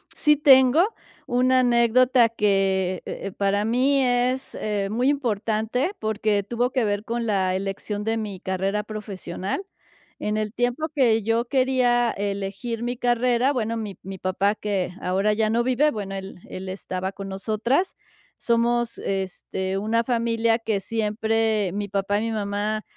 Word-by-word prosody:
Sí 300 -1 +3
tengo 275 +5 +6 0.4
una 255 +1 +3
anécdota 245 0 +4
que, 195 -4 +1
eh - - -5
eh, - - -5
para 200 +1 0
mí 260 +5 +2
es, 250 +1 0
eh, 205 -2 -2
muy 245 +6 +1
importante 230 - 0
porque 215 -1 0
tuvo 240 +4 -1
que 255 -4 +1
ver 205 0 -1
con 235 +1 -3
la 190 -4 +1
elección 195 +2 -3
de 225 +1 0
mi 205 -4 -5
carrera 195 +3 -1
profesional. 200 - -5 0.6
En 210 0 -1
el 215 -1 -2
tiempo 245 +6 0
que 235 -6 +3
yo 225 +3 +1
quería 250 -2 +2
elegir 200 +3 -4
mi 240 +1 -2
carrera, 245 +2 +2
bueno, 230 -3 -1
mi 210 -5 -5
mi 195 +1 -7
papá 190 +3 0
que 200 -4 -2
ahora 195 +3 +1
ya 215 0 +1
no 235 +1 +2
vive, 255 +5 +2
bueno, 195 -4 -5
él 190 0 -7
él 185 0 -6
estaba 185 0 -4
con 195 0 -8
nosotras. 220 - 0 0.4
Somos, 235 0 +1
este, 190 0 -3
una 225 +3 +1
familia 230 -1 +1
que 220 -3 -1
siempre 220 -1 0
mi 205 0 -3
papá 200 +1 0
y - - -2
mi 230 - -2
mamá 210 0 -2
220 Hz, 155 wpm, -24 LUFS, 200-240 Hz, 0.6 s, tengo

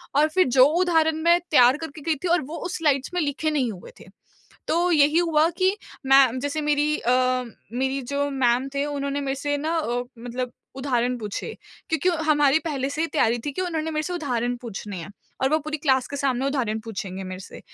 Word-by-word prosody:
और 300 +2 +5
फिर 370 -2 +3
जो 255 - +9 0.2
उदाहरण 320 -3 +3
मैं 340 +1 +5
तैयार 250 0 +6
करके 320 -2 -8
गई 320 +1 0
थी - - 0
और 345 +1 +3
वो 320 +4 -7
उस 360 - -3
स्लाइड्स 290 -2 +1
में 360 - 0
लिखे 305 +2 -1
नहीं 260 -6 0
हुए 180 -3 -11
थे। - - -13 0.6
तो 350 +2 +2
यही 300 +1 +4
हुआ 325 -2 +3
कि 375 +2 +2 0.3
मैं 265 -2 +5
जैसे 285 +2 -2
मेरी 295 0 +1
अ, 245 - +1 0.6
मेरी 265 +2 -1
जो 280 +3 -1
मैम 260 0 +1
थे 280 +1 0
उन्होंने 280 -1 -2
मेरे 270 -1 -2
से 290 0 0
ना 320 +3 -1
अ, 245 -6 -1 0.2
मतलब 245 +1 -5 0.2
उदाहरण 250 -2 0
पूछे। 215 - -5 0.3
क्योंकि 320 +3 +1 0.2
हमारी 295 -1 +4
पहले 280 -4 -2
से 305 - -4
ही - - +1
तैयारी 240 -6 +1
थी 290 - -2
कि 370 - -3
उन्होंने 320 -3 -2
मेरे 305 0 -1
से 360 - -4
उदाहरण 245 -7 -1
पूछने 205 -3 -6
हैं, 175 +3 -7 0.3
और 265 - +3
वो 310 - +3
पूरी 310 0 -4
क्लास 265 -4 +2
के 285 - -5
सामने 270 -1 0
उदाहरण 240 -6 -1
पूछेंगे 195 -3 -5
मेरे 185 0 -7
से। - - -11
285 Hz, 210 wpm, -24 LUFS, 250-315 Hz, 0.6 s, जो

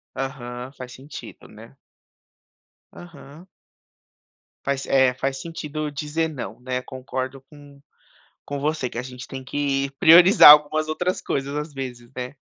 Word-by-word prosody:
Aham, 130 -1 -6
faz 125 -3 -10
sentido, 135 +5 -11
né. - - -15 1.2
Aham. 165 0 -13 1.2
Faz 140 0 -1
é, 130 -2 +3
faz 135 +1 -3
sentido 155 -2 -5
dizer 150 +3 -2
não, 120 -8 -7
né. 125 0 -3
Concordo 130 +1 -6
com 145 -2 -16 0.7
com 145 0 -4
você, 145 -3 -1
que - - -7
a 125 - -2
gente 125 0 -9
tem 135 -1 -8
que 140 0 -1
priorizar 175 +1 +9
algumas 150 +1 +5
outras 180 +4 -2
coisas, 140 +1 -3
às 150 +1 -4
vezes, 125 -3 -7
né. 125 +2 -6
140 Hz, 135 wpm, -23 LUFS, 130-150 Hz, 1.2 s, priorizar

